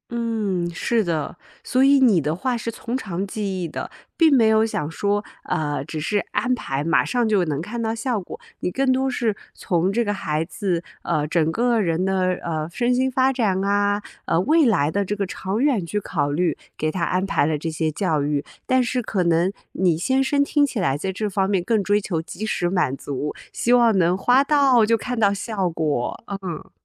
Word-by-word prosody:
嗯， 220 Hz, -7 st, -1 dB
是 225 Hz, +6 st, +1 dB
的。 165 Hz, -5 st, -3 dB, 0.3 s
所 255 Hz, -, +1 dB
以 275 Hz, 0 st, +6 dB
你 230 Hz, -9 st, +5 dB
的 150 Hz, +1 st, -1 dB
话 245 Hz, +7 st, -1 dB
是 230 Hz, -, -4 dB
从 235 Hz, +2 st, -4 dB
长 195 Hz, -6 st, -4 dB
计 195 Hz, -2 st, -3 dB
议 -, -, -2 dB
的， 155 Hz, -, -6 dB, 0.3 s
并 320 Hz, -4 st, +5 dB
没 225 Hz, -4 st, +5 dB
有 220 Hz, 0 st, +4 dB
想 150 Hz, -9 st, -3 dB
说， 205 Hz, +4 st, 0 dB, 0.2 s
呃， 145 Hz, -3 st, -2 dB
只 155 Hz, +1 st, -5 dB
是 175 Hz, +7 st, 0 dB
安 255 Hz, -, +1 dB
排 140 Hz, -, -2 dB
马 165 Hz, -, +2 dB
上 245 Hz, -2 st, +1 dB
就 200 Hz, -4 st, +3 dB
能 150 Hz, -2 st, -2 dB
看 225 Hz, +7 st, -5 dB
到 225 Hz, 0 st, -1 dB
效 230 Hz, 0 st, -1 dB
果。 180 Hz, -, -8 dB, 0.2 s
你 -, -, -1 dB
更 265 Hz, +5 st, +1 dB
多 265 Hz, +1 st, +1 dB
是 230 Hz, -4 st, 0 dB, 0.2 s
从 175 Hz, +1 st, 0 dB
这 235 Hz, +3 st, +2 dB
个 205 Hz, -2 st, -1 dB
孩 155 Hz, -5 st, -1 dB
子， 175 Hz, 0 st, -2 dB, 0.2 s
呃， 150 Hz, -1 st, 0 dB
整 160 Hz, 0 st, +1 dB
个 235 Hz, +3 st, +1 dB
人 175 Hz, -3 st, 0 dB
的， 185 Hz, -1 st, +1 dB
呃， 155 Hz, -1 st, -3 dB
身 245 Hz, +4 st, +1 dB
心 260 Hz, +1 st, +2 dB
发 260 Hz, +1 st, +2 dB
展 205 Hz, -7 st, 0 dB
啊， 205 Hz, +1 st, +1 dB, 0.2 s
呃， 165 Hz, -, +1 dB
未 310 Hz, -, +4 dB
来 165 Hz, -, +2 dB
的 200 Hz, +2 st, 0 dB
这 205 Hz, -, -2 dB
个 200 Hz, -1 st, -1 dB
长 190 Hz, +4 st, -3 dB
远 250 Hz, -11 st, +2 dB
去 210 Hz, -, -3 dB
考 150 Hz, -7 st, -1 dB
虑， 165 Hz, +1 st, 0 dB, 0.2 s
给 155 Hz, 0 st, -1 dB
他 175 Hz, +1 st, -3 dB
安 185 Hz, +2 st, 0 dB
排 195 Hz, -, +1 dB
了 155 Hz, 0 st, 0 dB
这 165 Hz, +3 st, -4 dB
些 160 Hz, 0 st, -1 dB
教 160 Hz, -3 st, 0 dB
育。 145 Hz, 0 st, -1 dB, 0.2 s
但 260 Hz, -1 st, +3 dB
是 250 Hz, +1 st, -1 dB
可 205 Hz, -5 st, -1 dB
能 170 Hz, +2 st, +2 dB, 0.2 s
你 180 Hz, -4 st, +2 dB
先 260 Hz, +10 st, +1 dB
生 280 Hz, +1 st, +2 dB
听 290 Hz, 0 st, +2 dB
起 260 Hz, -, -5 dB
来 140 Hz, -7 st, +1 dB
在 190 Hz, +5 st, -3 dB
这 210 Hz, +3 st, -2 dB
方 195 Hz, 0 st, 0 dB
面 190 Hz, -3 st, +1 dB
更 220 Hz, +3 st, +1 dB
追 205 Hz, +1 st, +2 dB
求 170 Hz, -5 st, -2 dB
及 185 Hz, +5 st, -6 dB
时 175 Hz, -5 st, 0 dB
满 175 Hz, -8 st, 0 dB
足， 145 Hz, +1 st, -4 dB, 0.2 s
希 240 Hz, -, 0 dB
望 235 Hz, -4 st, +5 dB
能 180 Hz, 0 st, +3 dB
花 245 Hz, +7 st, +4 dB
到 280 Hz, -3 st, +4 dB, 0.2 s
看 250 Hz, 0 st, -4 dB
到 200 Hz, -2 st, +4 dB
效 200 Hz, -2 st, -2 dB
果。 155 Hz, -7 st, -2 dB, 0.2 s
嗯。 175 Hz, -4 st, -6 dB
195 Hz, 230 characters per minute, -22 LUFS, 170-235 Hz, 0.3 s, 以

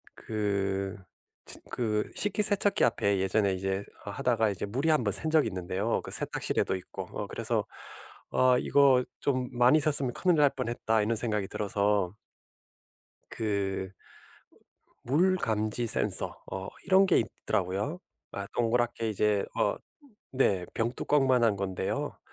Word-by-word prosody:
그 100 Hz, -2 st, -2 dB, 0.5 s
츠 -, -, -4 dB
그 105 Hz, -3 st, -1 dB
식기세척기 205 Hz, 0 st, +3 dB
앞에 100 Hz, -1 st, +1 dB
예전에 100 Hz, +1 st, +1 dB
이제 95 Hz, +1 st, -2 dB, 0.2 s
하다가 110 Hz, +2 st, 0 dB
이제 100 Hz, 0 st, -4 dB
물이 135 Hz, +10 st, -1 dB
한번 155 Hz, -, +2 dB
샌 160 Hz, -, +1 dB
적이 155 Hz, -5 st, +3 dB
있는데요. 95 Hz, +4 st, -2 dB
그 -, -, -9 dB
세탁실에도 -, -, 0 dB
있고. 90 Hz, -, -8 dB
어 -, -, -5 dB
그래서 -, -, -2 dB, 0.7 s
아 130 Hz, -1 st, +4 dB
'이거 135 Hz, -3 st, +4 dB, 0.2 s
좀 130 Hz, -3 st, -1 dB
많이 125 Hz, +5 st, +4 dB
샜으면 140 Hz, -4 st, +3 dB
큰일 180 Hz, -3 st, +2 dB
날 145 Hz, -2 st, +5 dB
뻔했다.' 120 Hz, -3 st, -1 dB
이런 115 Hz, +2 st, 0 dB
생각이 105 Hz, -4 st, -1 dB
들어서 100 Hz, -2 st, 0 dB, 1.1 s
그 100 Hz, -3 st, -2 dB
어 -, -, -31 dB, 1.0 s
물 175 Hz, +9 st, +3 dB
감지 110 Hz, -, -1 dB
센서 -, -, +3 dB
어 95 Hz, 0 st, -5 dB, 0.2 s
이런 190 Hz, 0 st, +5 dB
게 185 Hz, -, +3 dB
있더라고요. 100 Hz, -, -2 dB, 0.3 s
아 100 Hz, 0 st, -6 dB
동그랗게 120 Hz, -1 st, 0 dB
이제 105 Hz, -1 st, +1 dB
어 -, -, +1 dB, 0.6 s
네 95 Hz, -9 st, +2 dB
병뚜껑만 125 Hz, +2 st, +1 dB
한 110 Hz, -3 st, +3 dB
건데요. 95 Hz, -2 st, -3 dB
110 Hz, 265 characters per minute, -28 LUFS, 100-130 Hz, 1.1 s, 날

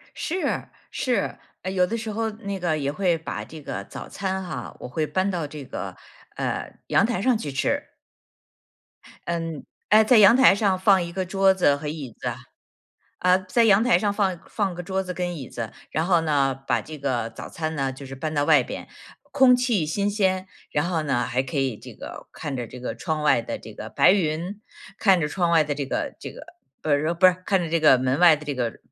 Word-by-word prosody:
是 365 Hz, +3 st, -2 dB, 0.2 s
是， 250 Hz, -2 st, -1 dB, 0.2 s
呃， 185 Hz, -, -3 dB
有 180 Hz, -1 st, +2 dB
的 230 Hz, -, -2 dB
时 220 Hz, -1 st, -5 dB
候 225 Hz, +1 st, -1 dB
那 200 Hz, -2 st, -6 dB
个 170 Hz, -3 st, 0 dB
也 140 Hz, -1 st, -1 dB
会 175 Hz, +1 st, +1 dB
把 160 Hz, -, -5 dB
这 160 Hz, -1 st, -11 dB
个 -, -, -5 dB
早 -, -, -9 dB
餐 190 Hz, -1 st, -3 dB
哈， 155 Hz, -, -6 dB
我 -, -, -7 dB
会 155 Hz, +4 st, -1 dB
搬 190 Hz, +4 st, 0 dB
到 170 Hz, -5 st, -2 dB
这 145 Hz, -1 st, -9 dB
个， -, -, -6 dB, 0.4 s
呃， -, -, -3 dB, 0.2 s
阳 -, -, +4 dB
台 230 Hz, -6 st, -2 dB
上 250 Hz, +1 st, +3 dB
去 145 Hz, -9 st, -5 dB
吃。 135 Hz, -, -1 dB, 1.4 s
嗯 165 Hz, -3 st, -3 dB, 0.2 s
呃， 215 Hz, +1 st, +7 dB
在 245 Hz, +2 st, +5 dB
阳 210 Hz, +3 st, +8 dB
台 260 Hz, -7 st, +7 dB
上 200 Hz, -3 st, +1 dB
放 190 Hz, -1 st, +4 dB
1 170 Hz, 0 st, -6 dB
个 190 Hz, +1 st, -2 dB
桌 195 Hz, +1 st, +4 dB
子 160 Hz, -6 st, +3 dB
和 150 Hz, +1 st, -7 dB
椅 145 Hz, -6 st, -6 dB
子， 120 Hz, -1 st, -3 dB, 0.9 s
呃， 180 Hz, +1 st, +4 dB
在 235 Hz, +5 st, +3 dB
阳 205 Hz, 0 st, +5 dB
台 250 Hz, -, +5 dB
上 205 Hz, -2 st, 0 dB
放 190 Hz, -4 st, 0 dB
放 195 Hz, -4 st, -2 dB
个 180 Hz, -, -6 dB
桌 190 Hz, +2 st, -2 dB
子 180 Hz, -1 st, -6 dB
跟 175 Hz, -1 st, -3 dB
椅 130 Hz, -4 st, -7 dB
子， 115 Hz, -2 st, -6 dB, 0.2 s
然 160 Hz, -, 0 dB
后 175 Hz, -2 st, +3 dB
呢， 140 Hz, -4 st, +2 dB
把 -, -, +2 dB
这 155 Hz, -1 st, -9 dB
个 120 Hz, -5 st, -1 dB
早 115 Hz, -, -9 dB
餐 160 Hz, -1 st, -4 dB
呢， 135 Hz, -1 st, -1 dB
就 135 Hz, +1 st, -10 dB
是 135 Hz, -, -8 dB
搬 155 Hz, +3 st, -4 dB
到 145 Hz, -, +2 dB
外 -, -, +5 dB
边。 -, -, -7 dB, 0.4 s
空 265 Hz, -3 st, +6 dB
气 235 Hz, -10 st, +1 dB
新 200 Hz, +6 st, 0 dB
鲜， 190 Hz, -2 st, 0 dB, 0.2 s
然 145 Hz, +1 st, 0 dB
后 165 Hz, -3 st, 0 dB
呢， 125 Hz, -4 st, +1 dB
还 125 Hz, +2 st, 0 dB
可 135 Hz, +2 st, -6 dB
以 135 Hz, -5 st, 0 dB
这 -, -, -11 dB
个 -, -, -10 dB
看 145 Hz, -2 st, -5 dB
着 120 Hz, -2 st, -4 dB
这 125 Hz, -, -10 dB
个 125 Hz, -, -4 dB
窗 155 Hz, -3 st, -3 dB
外 150 Hz, -, +4 dB
的 -, -, -5 dB
这 -, -, -11 dB
个 -, -, -8 dB
白 -, -, +5 dB
云， 180 Hz, +2 st, -1 dB, 0.4 s
看 190 Hz, -4 st, +4 dB
着 150 Hz, -, +1 dB
窗 175 Hz, +2 st, 0 dB
外 165 Hz, -2 st, +5 dB
的 145 Hz, -1 st, -2 dB
这 140 Hz, -2 st, -3 dB
个 -, -, -3 dB
这 -, -, -6 dB
个 -, -, -12 dB, 0.4 s
不 155 Hz, -, -2 dB
是 155 Hz, +4 st, +2 dB
不 185 Hz, +2 st, +5 dB
是 185 Hz, 0 st, +2 dB
看 195 Hz, -, +3 dB
着 165 Hz, -, -4 dB
这 165 Hz, -1 st, +1 dB
个 155 Hz, -4 st, +7 dB
门 130 Hz, +2 st, 0 dB
外 170 Hz, -3 st, +7 dB
的 150 Hz, -, -11 dB
这 145 Hz, -2 st, -3 dB
个 120 Hz, -3 st, -3 dB
170 Hz, 240 characters per minute, -24 LUFS, 145-195 Hz, 1.4 s, 阳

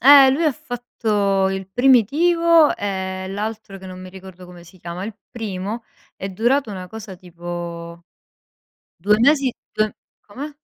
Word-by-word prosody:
Eh, 275 Hz, +1 st, +9 dB
lui 315 Hz, +5 st, +1 dB
ha 300 Hz, -, +3 dB
fatto 210 Hz, -6 st, 0 dB
il 190 Hz, 0 st, -4 dB
primitivo 300 Hz, -, +4 dB
e 190 Hz, -1 st, -3 dB
l'altro 210 Hz, 0 st, -5 dB
che 190 Hz, -, -11 dB
non 185 Hz, 0 st, -8 dB
mi 185 Hz, -, -9 dB
ricordo 185 Hz, -1 st, -12 dB
come 175 Hz, -1 st, -13 dB
si 180 Hz, +2 st, -17 dB
chiama. 175 Hz, +3 st, -6 dB
Il 215 Hz, 0 st, -6 dB, 0.2 s
primo 215 Hz, 0 st, -4 dB, 0.3 s
è 195 Hz, -, -5 dB
durato 240 Hz, +5 st, +1 dB
una 185 Hz, -2 st, -6 dB
cosa 215 Hz, -2 st, -8 dB
tipo 170 Hz, -1 st, -7 dB, 0.9 s
2 210 Hz, +5 st, +2 dB
mesi 275 Hz, 0 st, +4 dB, 0.2 s
2 215 Hz, -1 st, 0 dB, 0.3 s
come? 285 Hz, +8 st, -8 dB
205 Hz, 145 wpm, -21 LUFS, 185-245 Hz, 0.9 s, Eh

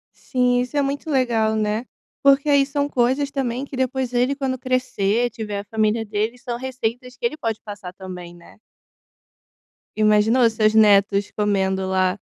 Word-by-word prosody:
Sim, 250 Hz, -1 st, +1 dB
isso 250 Hz, +3 st, -5 dB
é -, -, +4 dB
muito 280 Hz, +3 st, -3 dB
legal, 235 Hz, -6 st, +1 dB
né, 215 Hz, +2 st, -1 dB, 0.4 s
porque 275 Hz, +1 st, +4 dB
aí 280 Hz, -1 st, +5 dB
são 285 Hz, +1 st, -2 dB
coisas 265 Hz, +3 st, +1 dB
também 255 Hz, -2 st, -2 dB
que 275 Hz, -, -8 dB
depois 260 Hz, -1 st, -1 dB
ele 250 Hz, +3 st, +1 dB
quando 265 Hz, -2 st, -2 dB
crescer 245 Hz, -3 st, 0 dB
tiver 210 Hz, -3 st, -5 dB
a -, -, -6 dB
família 220 Hz, +1 st, 0 dB
dele, 215 Hz, +3 st, -2 dB
são 245 Hz, -2 st, -5 dB
receitas 250 Hz, -1 st, -4 dB
que 245 Hz, -, -5 dB
ele 270 Hz, +6 st, -1 dB
pode 225 Hz, -7 st, -3 dB
passar 205 Hz, -4 st, -8 dB
também, 180 Hz, -2 st, -9 dB
né. 170 Hz, -, -18 dB, 1.4 s
Imaginou 215 Hz, +3 st, +4 dB
seus 215 Hz, -1 st, +2 dB
netos 205 Hz, -2 st, +4 dB
comendo 190 Hz, -2 st, 0 dB
lá 185 Hz, +1 st, +1 dB
235 Hz, 160 wpm, -22 LUFS, 210-260 Hz, 1.4 s, aí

